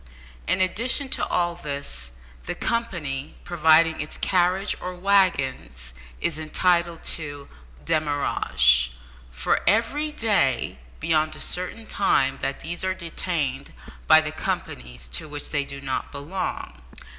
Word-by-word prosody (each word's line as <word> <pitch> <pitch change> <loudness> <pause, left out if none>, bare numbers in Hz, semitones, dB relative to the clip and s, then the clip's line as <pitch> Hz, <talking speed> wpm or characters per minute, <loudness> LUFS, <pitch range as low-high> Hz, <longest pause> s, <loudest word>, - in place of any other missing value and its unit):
In 185 - +2
addition 240 +9 +2
to - - -1
all 175 -1 +1
this, 140 - -6 0.4
the - - -2
company 160 -12 -2
providing 160 -1 +4
its 150 - -5
carriages 185 +2 +1
or 180 0 -5
waggons 140 - +1 0.3
is 160 -2 -1
entitled 170 +1 +1
to 145 -3 -3 0.4
"demurrage" 65 - +2 0.4
for 60 +1 0
every 235 - +2
day 140 - +1 0.2
beyond 155 -1 +1
a - - -10
certain 185 +5 -2
time 135 -11 +2
that 135 +1 -3
these 170 +2 -2
are 185 0 0
detained 160 -6 -2 0.3
by - - +8
the - - -4
companies 60 -1 -4
to 150 - 0
which 145 0 -7
they 145 -2 0
do 140 0 -8
not 135 -1 -3
belong. 145 - -5
155 Hz, 125 wpm, -24 LUFS, 135-185 Hz, 0.4 s, by